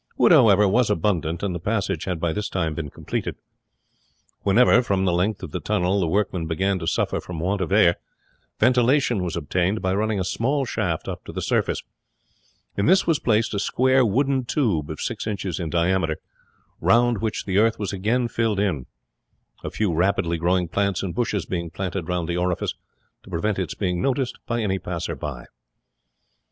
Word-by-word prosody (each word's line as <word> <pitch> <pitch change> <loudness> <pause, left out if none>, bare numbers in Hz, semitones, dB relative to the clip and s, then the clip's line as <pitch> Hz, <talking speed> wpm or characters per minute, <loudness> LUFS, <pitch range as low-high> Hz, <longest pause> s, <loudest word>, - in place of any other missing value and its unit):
Wood, - - +5
however, 105 -2 +6
was 115 +4 +2
abundant, 85 -6 0
and 100 -3 -1
the 85 - -4
passage 100 -2 -1
had 90 -3 -2
by 80 -1 0
this 105 +2 -3
time 80 -4 -1
been 75 -1 -5
completed. - - -4 1.1
Whenever, 120 +4 +5
from 100 -5 0
the 90 - +2
length 95 +5 0
of - - -6
the - - -3
tunnel, 90 +3 0
the 90 - +1
workmen 90 -2 0
began 95 +4 0
to 80 - -5
suffer - - 0
from 90 -3 -7
want 95 +4 -1
of 95 - -2
air, 90 -4 +5 0.6
ventilation 125 -2 +3
was 90 -2 -3
obtained 90 +5 0
by 95 -1 0
running 105 +1 0
a - - 0
small 135 +9 0
shaft 95 -9 -2
up - - -5
to - - -7
the - - -4
surface; - - 0 0.9
in 100 - 0
this 190 +3 +5
was 165 -4 +2
placed 110 -1 +1
a 100 - -1
square 130 +5 +3
wooden 130 +4 +1
tube 105 - 0
of - - -6
six - - -3
inches 100 -5 -3
in 85 -3 -3
diameter, 85 -1 +1 0.6
round 120 -1 +3
which 110 0 -2
the 95 0 +1
earth 115 +1 +3
was 105 -1 -3
again 115 +6 0
filled 115 -3 0
in 90 -11 -1 0.8
a - - -3
few 105 -5 -1
rapidly 85 -1 +1
growing 90 +1 +1
plants 100 +2 0
and 90 -3 -3
bushes 105 -4 -1
being 85 -2 -3
planted 90 -1 -4
round 90 -2 -1
the 85 - -2
orifice 90 0 -1 0.5
to - - -16
prevent 95 +4 -1
its 95 - -3
being 90 -3 -1
noticed 130 -2 -1
by 120 -1 -1
any 95 -3 0
passerby. 75 -8 -5
95 Hz, 185 wpm, -23 LUFS, 85-110 Hz, 1.1 s, however